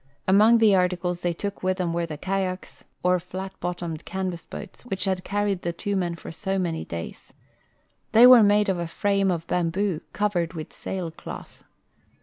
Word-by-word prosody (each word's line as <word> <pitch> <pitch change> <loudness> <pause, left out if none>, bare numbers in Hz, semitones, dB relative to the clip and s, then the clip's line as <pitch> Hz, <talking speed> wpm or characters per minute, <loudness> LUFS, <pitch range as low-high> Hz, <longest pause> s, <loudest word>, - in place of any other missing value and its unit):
Among 210 +5 +6
the 220 -3 +5
articles 180 -1 +1
they 175 - 0
took 200 +4 -4
Avith 185 0 0
them 180 -3 -1
Avere 170 0 -1
the 155 -2 -6
kayaks, 185 +1 -3 0.2
or 180 0 +3
flat 185 +2 -7
bottomed 175 -2 -4
canvas 185 -2 -4
boats, - - -9
Avhich 195 -6 -3
had 190 -1 -1
carried 205 -2 -1
the 170 - -2
tAVO 200 +4 -3
men 175 -3 -1
for - - -9
so 195 +3 -2
many 170 -4 -1
days. 85 0 -8 0.8
The}^ 225 +2 +8
Avere 250 -3 +9
made 205 0 +4
of 190 -2 0
a 170 - -2
frame 195 +2 +1
of 170 -2 -1
bamboo, 175 +1 0
covered 180 -5 0
Avith 160 -3 -7
sailcloth. 175 -4 -7
185 Hz, 175 wpm, -25 LUFS, 170-200 Hz, 0.8 s, Avere